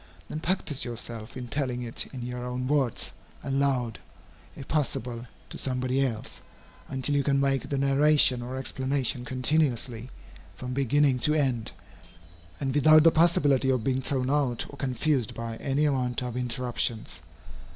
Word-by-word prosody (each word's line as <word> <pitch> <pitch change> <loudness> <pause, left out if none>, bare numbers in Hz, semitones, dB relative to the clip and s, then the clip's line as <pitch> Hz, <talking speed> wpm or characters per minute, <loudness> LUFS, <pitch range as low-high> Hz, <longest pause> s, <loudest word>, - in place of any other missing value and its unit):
Then 155 - -4
practise 165 -4 -1
yourself 115 -1 -6
in 125 -1 -6
telling 125 -2 -2
it 115 -1 -1
in 125 -3 -6
your 125 0 -5
own 125 +1 -3
words, 135 -4 0 0.3
aloud, 135 -4 0 0.6
if 135 - -9
possible, 125 -5 -2 0.2
to - - -6
somebody 130 +1 0
else, 115 -5 -4 0.5
until 135 +2 0
you 140 - +3
can 140 0 +2
make 135 -1 0
the 140 - -1
narration 140 -1 +4
or 125 +2 -5
explanation 130 -2 -1
continuously, 130 -3 0 0.5
from 125 0 -6
beginning 140 0 +2
to 150 +5 +2
end, 130 -7 0 0.9
and 135 -2 -1
without 155 +2 +6
the 165 - +7
possibility 145 -5 +3
of 130 -4 +1
being 130 +1 0
thrown 130 0 -1
out 135 -5 +1
or - - -10
confused 130 -2 0
by 115 -1 -5
any 140 +4 0
amount 125 -4 0
of 125 -1 -4
interruptions. 120 -2 -1
130 Hz, 150 wpm, -27 LUFS, 125-140 Hz, 0.9 s, the